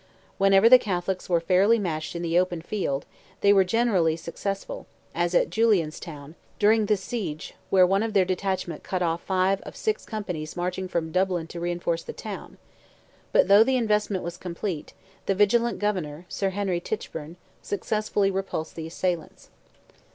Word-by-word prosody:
Whenever 195 Hz, +2 st, +6 dB
the 255 Hz, +2 st, +9 dB
Catholics 185 Hz, -3 st, -3 dB
were 170 Hz, -2 st, +3 dB
fairly 190 Hz, +7 st, +4 dB
matched 165 Hz, -6 st, -3 dB
in 170 Hz, -, -3 dB
the 170 Hz, +1 st, +3 dB
open 180 Hz, -2 st, 0 dB
field, 160 Hz, -6 st, -2 dB, 0.4 s
they 200 Hz, 0 st, +6 dB
were 195 Hz, -1 st, +6 dB
generally 185 Hz, -6 st, +2 dB
successful, 195 Hz, +4 st, -5 dB, 0.3 s
as 175 Hz, +1 st, 0 dB
at -, -, +3 dB
Julianstown, 165 Hz, -8 st, 0 dB, 0.2 s
during 215 Hz, 0 st, +4 dB
this 205 Hz, -2 st, +1 dB
siege, 190 Hz, -11 st, -4 dB, 0.2 s
where 185 Hz, -1 st, +6 dB
one 195 Hz, +2 st, +2 dB
of 225 Hz, -1 st, -2 dB
their 195 Hz, -3 st, +4 dB
detachments 185 Hz, -1 st, -2 dB
cut 185 Hz, -1 st, -2 dB
off 165 Hz, 0 st, 0 dB
five 190 Hz, +1 st, +1 dB
out -, -, -13 dB
of -, -, -9 dB
six 435 Hz, -1 st, -1 dB
companies 180 Hz, -8 st, -5 dB
marching 180 Hz, +1 st, -2 dB
from 165 Hz, -3 st, -2 dB
Dublin 185 Hz, -2 st, +1 dB
to 170 Hz, +1 st, -8 dB
reinforce 170 Hz, -1 st, -1 dB
the -, -, -8 dB
town; -, -, -8 dB, 0.7 s
but -, -, +4 dB
though 200 Hz, +2 st, +8 dB
the 260 Hz, +2 st, +1 dB
investment 210 Hz, -4 st, 0 dB
was 170 Hz, +1 st, -5 dB
complete, 175 Hz, -2 st, -5 dB, 0.3 s
the 195 Hz, -, +2 dB
vigilant 235 Hz, +4 st, +3 dB
governor, 180 Hz, -6 st, -2 dB
Sir 195 Hz, -, -1 dB
Henry 190 Hz, -2 st, -1 dB
Tichburne, 165 Hz, -6 st, -5 dB, 0.3 s
successfully 205 Hz, -1 st, 0 dB
repulsed 190 Hz, -4 st, -3 dB
the 160 Hz, -1 st, -5 dB
assailants. 175 Hz, -1 st, -4 dB
185 Hz, 165 wpm, -26 LUFS, 170-205 Hz, 0.7 s, the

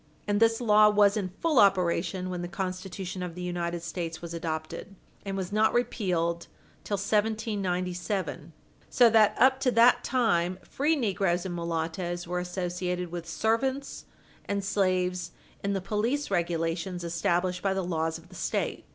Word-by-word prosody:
And 205 Hz, 0 st, +1 dB
this 225 Hz, 0 st, +4 dB
law 215 Hz, -3 st, +6 dB
was 205 Hz, -1 st, +4 dB
in 200 Hz, -4 st, -2 dB
full 320 Hz, -6 st, +3 dB
operation 185 Hz, -1 st, +2 dB
when 180 Hz, -1 st, -3 dB
the 175 Hz, -, -4 dB
Constitution 185 Hz, +1 st, -5 dB
of 180 Hz, -2 st, -5 dB
the 180 Hz, -, -6 dB
United 175 Hz, -1 st, -3 dB
States 165 Hz, -1 st, -4 dB
was 170 Hz, -1 st, -7 dB
adopted, 165 Hz, +3 st, -5 dB, 0.3 s
and 195 Hz, -1 st, -4 dB
was 185 Hz, -1 st, -4 dB
not 215 Hz, +2 st, +2 dB
repealed 180 Hz, -8 st, 0 dB, 0.4 s
till 205 Hz, -, -2 dB
1797. 195 Hz, -5 st, -1 dB, 0.4 s
So 240 Hz, -2 st, +5 dB
that, 215 Hz, -2 st, +5 dB
up 260 Hz, +1 st, +5 dB
to 270 Hz, -1 st, +2 dB
that 245 Hz, +1 st, +5 dB
time, 185 Hz, -8 st, +1 dB
free 300 Hz, +4 st, 0 dB
negroes 195 Hz, -, 0 dB
and 185 Hz, -, -3 dB
mulattoes 170 Hz, +1 st, -3 dB
were 180 Hz, +1 st, -2 dB
associated 180 Hz, 0 st, -3 dB
with 170 Hz, -1 st, -6 dB
servants 260 Hz, +9 st, -1 dB, 0.4 s
and 200 Hz, 0 st, -2 dB
slaves 185 Hz, -2 st, 0 dB, 0.3 s
in 200 Hz, 0 st, 0 dB
the 195 Hz, -, -1 dB
police 220 Hz, +8 st, -1 dB
regulations 170 Hz, 0 st, -1 dB
established 175 Hz, +2 st, 0 dB
by 195 Hz, -1 st, 0 dB
the 190 Hz, -2 st, -1 dB
laws 160 Hz, -2 st, -1 dB
of 165 Hz, +2 st, -17 dB
the -, -, -16 dB
State. -, -, -2 dB
185 Hz, 155 wpm, -28 LUFS, 175-210 Hz, 0.4 s, law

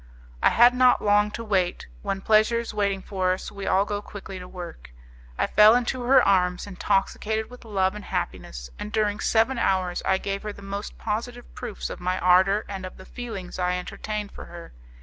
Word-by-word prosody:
I -, -, +6 dB
had 240 Hz, +1 st, +6 dB
not 250 Hz, 0 st, +4 dB
long 205 Hz, 0 st, +4 dB
to 230 Hz, -, -6 dB
wait: 190 Hz, -5 st, 0 dB, 0.2 s
when 195 Hz, 0 st, -3 dB
pleasure 220 Hz, +2 st, +4 dB
is 235 Hz, -1 st, -4 dB
waiting 200 Hz, -2 st, 0 dB
for 185 Hz, -2 st, 0 dB
us, 185 Hz, -, -6 dB
we 200 Hz, -1 st, -6 dB
all 195 Hz, +2 st, +3 dB
go 205 Hz, 0 st, -3 dB
quickly 195 Hz, -2 st, -9 dB
to 180 Hz, -, -9 dB
work. 175 Hz, -, -9 dB, 0.5 s
I -, -, +2 dB
fell 215 Hz, +2 st, +6 dB
into 250 Hz, +1 st, 0 dB
her 265 Hz, +2 st, +6 dB
arms, 180 Hz, -2 st, +2 dB
intoxicated 210 Hz, +3 st, -1 dB
with 250 Hz, -1 st, -13 dB
love 190 Hz, -3 st, +1 dB
and 210 Hz, -1 st, -8 dB
happiness, -, -, -4 dB
and 210 Hz, -, -5 dB
during 210 Hz, -1 st, 0 dB
seven 230 Hz, +4 st, +2 dB
hours 185 Hz, -3 st, +1 dB
I 190 Hz, -, +2 dB
gave 195 Hz, +1 st, -3 dB
her 210 Hz, -1 st, -5 dB
the 200 Hz, -, -13 dB
most 200 Hz, +1 st, -6 dB
positive 235 Hz, +3 st, -4 dB
proofs 235 Hz, -5 st, -6 dB
of -, -, -7 dB
my 180 Hz, +1 st, -1 dB
ardour 190 Hz, +3 st, +4 dB
and 195 Hz, -2 st, -6 dB
of 185 Hz, -, -8 dB
the 190 Hz, -, -12 dB
feelings 205 Hz, -8 st, -7 dB
I 180 Hz, 0 st, +1 dB
entertained 210 Hz, +3 st, -5 dB
for -, -, -9 dB
her. 170 Hz, -1 st, -11 dB
200 Hz, 200 wpm, -25 LUFS, 185-220 Hz, 0.5 s, I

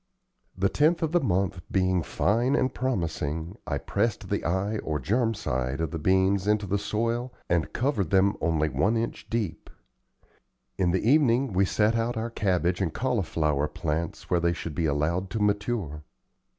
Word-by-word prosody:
The 95 Hz, +1 st, +3 dB
10th 160 Hz, -, +2 dB
of 160 Hz, -, 0 dB
the 175 Hz, -, +4 dB
month 95 Hz, -, 0 dB
being 95 Hz, -2 st, +2 dB
fine 115 Hz, -, +1 dB
and 130 Hz, -2 st, +1 dB
promising, 85 Hz, -, -2 dB
I 70 Hz, -, -1 dB
pressed -, -, -1 dB
the -, -, -1 dB
eye 100 Hz, +5 st, 0 dB
or 75 Hz, -1 st, -2 dB
germ 115 Hz, -, +1 dB
side 65 Hz, -3 st, -2 dB
of 80 Hz, -2 st, -1 dB
the 80 Hz, -, -3 dB
beans 95 Hz, +3 st, +2 dB
into 105 Hz, 0 st, +2 dB
the 100 Hz, +1 st, 0 dB
soil 115 Hz, +4 st, -1 dB, 0.2 s
and 85 Hz, -2 st, 0 dB
covered 120 Hz, -, 0 dB
them 100 Hz, +1 st, +3 dB
only 80 Hz, -2 st, +1 dB
one 85 Hz, -, +1 dB
inch 115 Hz, +1 st, -4 dB
deep. 110 Hz, -8 st, -3 dB, 1.1 s
In 90 Hz, -2 st, +1 dB
the 95 Hz, +5 st, 0 dB
evening 135 Hz, -4 st, +3 dB
we 95 Hz, +2 st, +3 dB
set 105 Hz, +4 st, +2 dB
out 115 Hz, +1 st, -1 dB
our 115 Hz, +1 st, -3 dB
cabbage 90 Hz, -4 st, 0 dB
and 90 Hz, -4 st, 0 dB
cauliflower 80 Hz, -, 0 dB
plants 75 Hz, +2 st, -3 dB
where 90 Hz, -, +2 dB
they 85 Hz, 0 st, +1 dB
should 85 Hz, -2 st, -6 dB
be 80 Hz, +1 st, 0 dB
allowed 80 Hz, +6 st, 0 dB
to 110 Hz, -, -3 dB
mature. 105 Hz, -7 st, -1 dB
95 Hz, 170 wpm, -27 LUFS, 85-115 Hz, 1.1 s, the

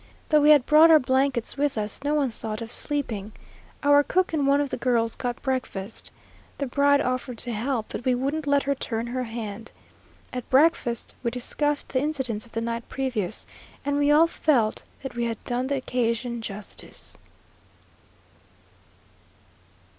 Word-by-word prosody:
Though 305 Hz, -1 st, +5 dB
we 295 Hz, -, +5 dB
had 290 Hz, -4 st, +7 dB
brought 315 Hz, +2 st, +7 dB
our 320 Hz, -, +9 dB
blankets 260 Hz, -2 st, 0 dB
with 285 Hz, -3 st, 0 dB
us, 210 Hz, +4 st, -1 dB
no 295 Hz, +1 st, +1 dB
one 280 Hz, -4 st, +1 dB
thought 215 Hz, -1 st, -5 dB
of 225 Hz, -, -9 dB
sleeping. 225 Hz, -10 st, -2 dB, 0.5 s
Our 285 Hz, 0 st, +6 dB
cook 365 Hz, +4 st, 0 dB
and 290 Hz, -3 st, +1 dB
one 280 Hz, +1 st, +4 dB
of 285 Hz, -2 st, -1 dB
the -, -, -2 dB
girls 230 Hz, -3 st, +1 dB
got 245 Hz, -1 st, -3 dB
breakfast. 245 Hz, -6 st, -3 dB, 0.5 s
The 280 Hz, -, -2 dB
bride 285 Hz, +2 st, +3 dB
offered 255 Hz, -1 st, -2 dB
to 240 Hz, +1 st, 0 dB
help, 230 Hz, +1 st, -1 dB
but -, -, -6 dB
we 255 Hz, 0 st, +2 dB
wouldn't 285 Hz, +4 st, -2 dB
let 285 Hz, 0 st, +3 dB
her 280 Hz, -, +1 dB
turn 230 Hz, -4 st, -3 dB
her 250 Hz, +1 st, -3 dB
hand. 225 Hz, -1 st, -6 dB, 0.6 s
At 250 Hz, -1 st, -5 dB
breakfast 265 Hz, -4 st, +2 dB
we 235 Hz, -, 0 dB
discussed 290 Hz, +4 st, -1 dB
the 255 Hz, -, 0 dB
incidents 260 Hz, -7 st, -1 dB
of -, -, -21 dB
the 225 Hz, -, -1 dB
night 230 Hz, 0 st, -4 dB
previous, 235 Hz, -7 st, -2 dB, 0.4 s
and 285 Hz, 0 st, 0 dB
we 290 Hz, 0 st, +3 dB
all 300 Hz, +3 st, +6 dB
felt 270 Hz, -9 st, +1 dB, 0.2 s
that 270 Hz, -, -5 dB
we 240 Hz, 0 st, -1 dB
had 230 Hz, -1 st, -2 dB
done 245 Hz, +1 st, -1 dB
the 280 Hz, -, 0 dB
occasion 235 Hz, -2 st, -1 dB
justice. 205 Hz, -1 st, -4 dB
255 Hz, 170 wpm, -25 LUFS, 230-285 Hz, 0.6 s, our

